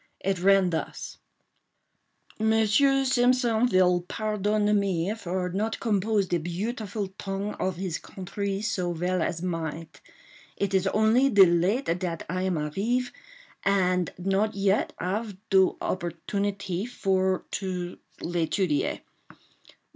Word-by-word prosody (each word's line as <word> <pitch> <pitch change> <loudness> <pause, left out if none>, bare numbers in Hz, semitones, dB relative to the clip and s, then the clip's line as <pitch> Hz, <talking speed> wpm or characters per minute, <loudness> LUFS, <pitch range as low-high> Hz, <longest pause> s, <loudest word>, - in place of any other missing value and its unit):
It 195 -1 -1
ran 195 0 +4
thus: 160 - -5 1.2
"Monsieur 225 +5 +3
Simpson 245 -2 +3
vill 180 -4 +3
pardonne 210 0 0
me 190 -1 0
for 185 -4 -3
not 210 +5 -2
compose 210 -1 +1
de 175 -1 0
butefulle 200 +3 -4
tong 195 +1 -3
of 185 -1 -1
his 180 -2 -3
contrée 195 +1 -4
so 180 -5 -1
vell 180 +2 -1
as 165 +1 -2
might. 165 -3 -4 0.6
It 200 -1 -1
is 190 0 +2
only 220 +7 +3
de 200 -6 +8
late 180 +3 +1
dat 170 -3 -3
I 185 +3 -2
am 185 -2 0
arrive, 210 +12 -1 0.5
and 185 -3 +2
not 195 +4 0
yet 200 0 +1
ave 205 +2 -3
do 190 -1 +4
opportunité 195 +3 -3
for 190 -5 0
to—l'étudier. 175 -2 -2
195 Hz, 115 wpm, -27 LUFS, 180-215 Hz, 1.2 s, de